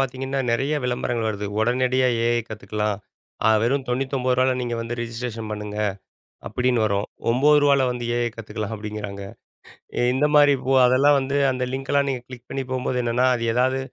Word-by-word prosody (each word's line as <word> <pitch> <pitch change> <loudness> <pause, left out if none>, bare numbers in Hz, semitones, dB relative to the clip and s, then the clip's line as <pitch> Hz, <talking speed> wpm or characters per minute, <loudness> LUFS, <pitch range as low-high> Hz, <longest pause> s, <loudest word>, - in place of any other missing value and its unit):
பார்த்தீங்கன்னா, 135 +1 -2
நிறைய 135 +5 0
விளம்பரங்கள் 120 -2 -1
வருது. 105 -1 -3
உடனடியாக 125 +1 +2
AI 120 0 +2
கததுக்கலாம். 105 -1 -3 0.5
அ - - +6
வெறும் 135 +3 +1
₹99 130 0 +1
ல - - +1
நீங்க 120 -1 -2
வந்து 115 +1 -4
ரிஜிஸ்ட்ரேஷன் 115 -1 -5
பண்ணுங்க. 105 -1 -5 0.7
அப்பிடின்னு 125 +1 +1
வரும். 100 -1 0 0.2
₹9 145 +2 +4
ல 130 - +3
வந்து 125 -1 -4
AI 120 0 +1
கத்துக்கலாம் 110 -1 -6
அப்பிடிங்கிறாங்க. 105 -2 -6 0.8
இ - - +1
இந்தமாரி 145 +1 +4
இப்போ 130 +1 -1
அதெல்லாம் 140 +3 +4
வந்து 140 +1 -1
அந்த 130 0 -2
லிங்க் 135 0 -5
எல்லாம் 140 0 +2
நீங்க 125 -2 -2
கிளிக் 125 -1 -11
பண்ணி 135 - -3
போம்போது 125 0 -1
என்னன்னா, 120 +2 +2
அது 115 -1 -3
ஏதாவது 130 +2 +2
125 Hz, 165 wpm, -23 LUFS, 115-130 Hz, 0.8 s, அ